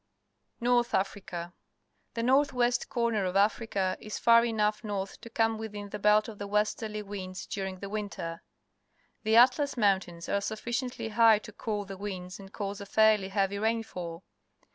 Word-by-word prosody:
North 240 0 +2
Africa. 185 -3 -3 0.3
— - - -46
The 230 - -1
north 275 +3 +3
west 245 -1 +1
corner 230 -4 0
of 185 0 -2
Africa 200 -2 +1
is 215 - -6
far 230 0 +6
enough 215 -2 0
north 200 -2 -4
to 230 - -10
come 225 -1 +1
within 210 -2 -6
the 210 - -6
belt 210 +1 +4
of 215 -3 -9
the 205 - -4
westerly 210 +1 -1
winds 190 -2 -6
during 190 -2 -4
the 200 - -4
winter. 200 -5 -5 0.8
The 220 +1 +2
AtJMS 255 +4 +5
IMoiintains 190 -5 +1
are 200 - +1
sufficiently 235 +3 -3
high 225 0 +6
to 215 - -10
cool 210 -1 -3
the 195 0 -8
windsand 195 -1 -7
cause 200 -1 -5
af 200 - -11
airly 215 -3 +5
heavy 195 0 0
rainfall. 195 -6 -3
210 Hz, 165 wpm, -29 LUFS, 195-225 Hz, 0.8 s, far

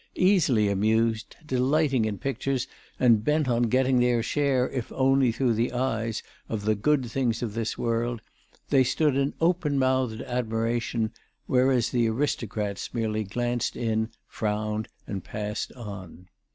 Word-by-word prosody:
Easily 155 - +3
amused, 110 +3 +1
delighting 130 -1 +2
in 105 -2 -2
pictures 135 +1 -2 0.3
and 115 -4 +4
bent 150 +2 +2
on 120 -1 +2
getting 130 0 +3
their 120 -1 +2
share, 135 -2 +1
if 125 -4 -4
only 135 -1 +3
through 120 +1 +1
the 115 +2 0
eyes, 115 -3 -1 0.3
of 105 -2 -3
the 110 - +3
good 130 +6 +1
things 120 -1 -1
of 110 -4 -3
this 115 0 -2
world, 115 0 -1 0.5
they 135 -2 +6
stood 135 +3 +1
in 140 +1 0
open 165 -4 +1
mouthed 130 -3 +1
admiration, 115 -1 -1 0.3
whereas 125 -2 +2
the 120 -2 +2
aristocrats 110 -6 -2
merely 110 -2 0
glanced 120 +4 -2
in, 110 -1 0 0.2
frowned 105 0 -2 0.2
and 95 -3 -5
passed 105 0 -4
on. 95 -6 -9
120 Hz, 140 wpm, -26 LUFS, 110-130 Hz, 0.5 s, they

